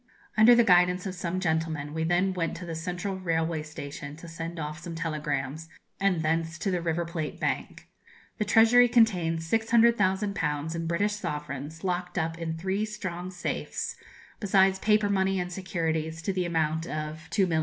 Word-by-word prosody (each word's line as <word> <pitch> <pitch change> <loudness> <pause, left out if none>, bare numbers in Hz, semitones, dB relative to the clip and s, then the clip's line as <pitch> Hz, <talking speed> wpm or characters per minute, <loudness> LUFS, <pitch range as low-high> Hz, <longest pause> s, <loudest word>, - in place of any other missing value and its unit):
Under 230 +3 +8
the 235 - +6
guidance 180 -1 +4
of 190 - -3
some 180 0 -3
gentlemen, 160 -4 -1
we 160 0 -1
then 175 +3 +2
went 170 -2 -2
to 180 - -7
the 165 - -5
Central 180 +4 -3
Railway 165 -2 0
Station 145 -1 -7
to 165 +2 -11
send 165 +1 -6
off 150 +1 -4
some 170 -1 -7
telegrams, 155 -1 -3 0.3
and 190 -4 +2
thence 160 0 0
to 195 +4 -1
the 180 -1 0
River 170 0 -1
Plate 165 -3 -4
Bank. - - -3 0.5
The 210 - +1
treasury 230 +4 +6
contains 180 -9 +2
600,000_l_. 200 -8 +2
in 165 0 -3
British 200 +5 +1
sovereigns, 150 -2 -5
locked 180 -1 -2
up 165 +1 0
in 160 -1 -3
three 190 +4 -1
strong 185 -5 -5
safes, 180 -1 -3 0.4
besides 190 -2 +3
paper 210 0 +3
money 195 -1 +1
and 180 0 -3
securities 160 -3 -2
to 195 - -1
the 185 -1 0
amount 160 0 0
of 155 +1 -5
2,000,000_l_. 175 -2 +2
170 Hz, 165 wpm, -28 LUFS, 160-190 Hz, 0.5 s, Under